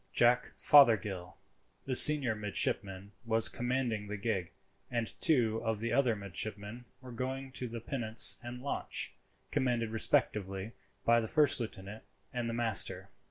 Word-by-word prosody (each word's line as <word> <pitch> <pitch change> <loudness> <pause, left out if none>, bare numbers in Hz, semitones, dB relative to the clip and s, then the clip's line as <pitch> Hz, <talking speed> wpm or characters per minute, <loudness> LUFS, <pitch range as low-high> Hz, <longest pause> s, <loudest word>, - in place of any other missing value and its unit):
Jack 120 +1 +1
Fothergill, 105 - +2 0.5
the 135 - -4
senior 135 -3 +9
midshipman, 100 -2 -3
was 115 -1 +3
commanding 120 -4 -4
the 105 +1 -7
gig, 100 -5 -4 0.4
and 115 -2 -3
two 115 -8 +2
of 110 -2 -4
the 115 +1 -5
other 125 -5 0
midshipmen 105 +4 -7 0.2
were 130 -1 -13
going 130 +2 -7
in 125 -2 -6
the 115 - -7
pinnace 115 -2 +3
and 120 0 -10
launch, 140 - -4 0.4
commanded 120 -3 -2
respectively 100 -2 -2 0.3
by 115 0 +2
the 110 - -5
first 150 -2 +1
lieutenant 105 -2 -8 0.3
and 120 -2 -5
the - - -5
master. 95 -5 +1
115 Hz, 140 wpm, -30 LUFS, 105-125 Hz, 0.5 s, senior